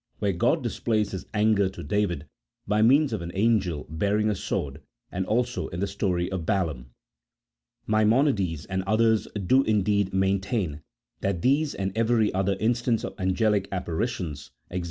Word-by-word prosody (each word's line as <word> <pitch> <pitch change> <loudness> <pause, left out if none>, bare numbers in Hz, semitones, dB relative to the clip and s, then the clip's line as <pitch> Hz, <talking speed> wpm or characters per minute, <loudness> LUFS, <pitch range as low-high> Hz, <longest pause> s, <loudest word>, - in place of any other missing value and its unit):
where 100 -2 0
God 85 - +1
displays 110 -3 -1
his 95 - -6
anger 105 -2 +2
to 95 -3 -9
David 90 -3 -1 0.4
by 105 +1 +2
means 135 +4 +4
of 110 - -2
an 85 - -5
angel 95 -7 +1
bearing 100 +7 0
a - - -1
sword, 70 -4 -3 0.3
and 95 +1 -3
also 120 +3 0
in 85 - -6
the 100 - +1
story 95 -3 -1
of 95 -3 -3
Balaam. 80 - -1 1.0
Maimonides 110 - +2
and 95 0 -2
others 110 +1 +3 0.2
do 130 +8 +5
indeed 100 -4 +1
maintain 95 - 0 0.4
that 95 -4 -2
these 145 +3 +2
and 95 0 -3
every 115 -1 +2
other 95 +1 0
instance 120 0 +1
of - - -4
angelic 100 +1 +1
apparitions 90 - -3 0.2
(e, - - -1
g. - - 0
100 Hz, 155 wpm, -26 LUFS, 90-110 Hz, 1.0 s, do